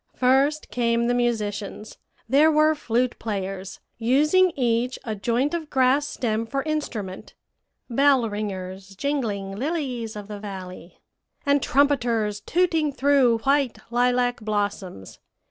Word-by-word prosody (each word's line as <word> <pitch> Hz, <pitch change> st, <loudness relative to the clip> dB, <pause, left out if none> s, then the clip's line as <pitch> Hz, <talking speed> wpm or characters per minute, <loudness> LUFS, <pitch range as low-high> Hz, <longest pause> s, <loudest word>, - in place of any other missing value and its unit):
"First 270 Hz, +4 st, +2 dB
came 235 Hz, -1 st, +1 dB
the 245 Hz, -, +2 dB
musicians; 215 Hz, -3 st, -2 dB, 0.3 s
there 285 Hz, +6 st, +5 dB
were 310 Hz, 0 st, +4 dB
flute 245 Hz, -4 st, -1 dB
players, 195 Hz, -3 st, -4 dB, 0.2 s
using 300 Hz, +10 st, +4 dB
each 245 Hz, 0 st, 0 dB
a 220 Hz, -, -3 dB
joint 235 Hz, +8 st, 0 dB
of 325 Hz, -3 st, -3 dB
grass 265 Hz, +2 st, +3 dB
stem 225 Hz, -4 st, -2 dB
for 275 Hz, +3 st, -2 dB
instrument, 230 Hz, -12 st, -4 dB, 0.5 s
bell 270 Hz, -1 st, +3 dB
ringers, 195 Hz, -2 st, -6 dB
jingling 205 Hz, -7 st, -2 dB
lilies 255 Hz, -4 st, -3 dB
of 205 Hz, -1 st, -7 dB
the 210 Hz, -1 st, -7 dB
valley, 185 Hz, -3 st, -9 dB, 0.4 s
and 285 Hz, 0 st, +3 dB
trumpeters 240 Hz, -8 st, +1 dB
tooting 325 Hz, -2 st, +1 dB
through 265 Hz, -4 st, +3 dB
white 275 Hz, -3 st, +2 dB
lilac 245 Hz, 0 st, +2 dB
blossoms. 205 Hz, -, -3 dB
240 Hz, 120 wpm, -24 LUFS, 210-280 Hz, 0.5 s, there